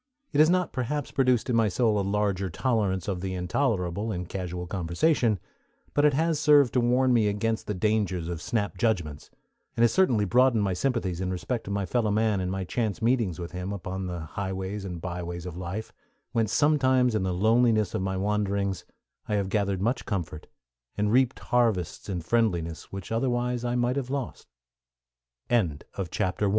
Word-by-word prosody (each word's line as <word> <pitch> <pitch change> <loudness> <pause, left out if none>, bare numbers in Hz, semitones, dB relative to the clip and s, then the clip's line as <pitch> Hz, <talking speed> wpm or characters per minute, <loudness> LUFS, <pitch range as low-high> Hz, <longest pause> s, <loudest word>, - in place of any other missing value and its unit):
It 145 - +1
has 155 +1 +7
not 180 0 +1
perhaps 135 +3 -2
produced 130 -3 +2
in 125 - +1
my 115 -1 +4
soul 105 +1 +2
a - - +2
larger 100 -1 0
tolerance 100 -2 0
of 95 -3 -2
the 95 0 -3
intolerable 90 +1 -1
in 90 -2 -3
casual 90 -1 -5
conversation, 100 - +1 0.5
but 145 - +2
it 145 -2 +4
has 160 0 +1
served 145 -4 +5
to 125 - +3
warn 125 +2 +3
me 110 -3 +3
against 110 +2 -1
the 105 - -2
dangers 95 -3 0
of 85 -1 -4
snap 100 0 -2
judgments, 85 -10 -1 0.5
and 115 - +4
has 120 - +4
certainly 125 - +3
broadened 120 +2 +4
my 95 -2 0
sympathies 95 -5 -1
in 95 - -1
respect 95 +6 -3
to - - -7
my 100 -1 -1
fellow 115 +2 0
man 105 -1 +2
in 90 - -2
my 95 0 -2
chance 110 +3 -2
meetings 115 -7 +1
with 85 -1 -6
him 90 +2 -4
upon 95 -1 -4
the 90 -2 -4
highways 95 +4 -4
and 90 -3 -6
byways 85 -1 -5
of 90 -2 -6
life, 90 +5 -5 0.4
whence 115 -3 0
sometimes, 130 -4 +3
in 110 - +1
the 95 -1 0
loneliness 110 +2 +3
of - - -1
my 95 0 -1
wanderings, 100 -1 -1 0.4
I 105 - 0
have 100 -2 0
gathered 100 -2 0
much 120 +5 -1
comfort, 85 -8 -4 0.5
and 105 0 +1
reaped 130 -1 +3
harvests 105 -3 0
in 90 -3 -2
friendliness 85 -5 -1
which 95 +1 -7
otherwise 120 +1 0
105 Hz, 170 wpm, -27 LUFS, 90-120 Hz, 0.5 s, has